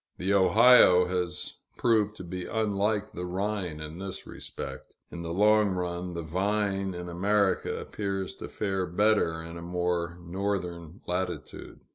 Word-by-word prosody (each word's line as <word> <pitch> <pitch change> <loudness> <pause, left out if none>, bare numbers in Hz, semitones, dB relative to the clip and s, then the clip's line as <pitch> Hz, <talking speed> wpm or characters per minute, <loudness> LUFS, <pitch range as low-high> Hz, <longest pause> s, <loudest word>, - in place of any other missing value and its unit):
The 95 +2 0
Ohio 100 -2 +7
has 90 -1 -3 0.2
proved 110 -3 +2
to - - -7
be 90 0 -5
unlike 105 -1 0
the 90 - -6
Rhine 95 -3 -2
in 75 +3 -7
this 95 -1 -6
respect. - - -8 0.2
In 85 - -6
the 85 -1 -4
long 105 +3 +4
run, 90 0 -3
the 85 - -3
vine 95 +2 -1
in 90 0 -6
America 100 +3 +1
appears 95 -2 -3
to - - -7
fare 95 -3 -2
better 90 -3 +2
in 85 +1 -8
a - - -8
more 90 0 -1
northern 90 -2 -3
latitude. 90 0 -4
95 Hz, 145 wpm, -28 LUFS, 85-100 Hz, 0.2 s, Ohio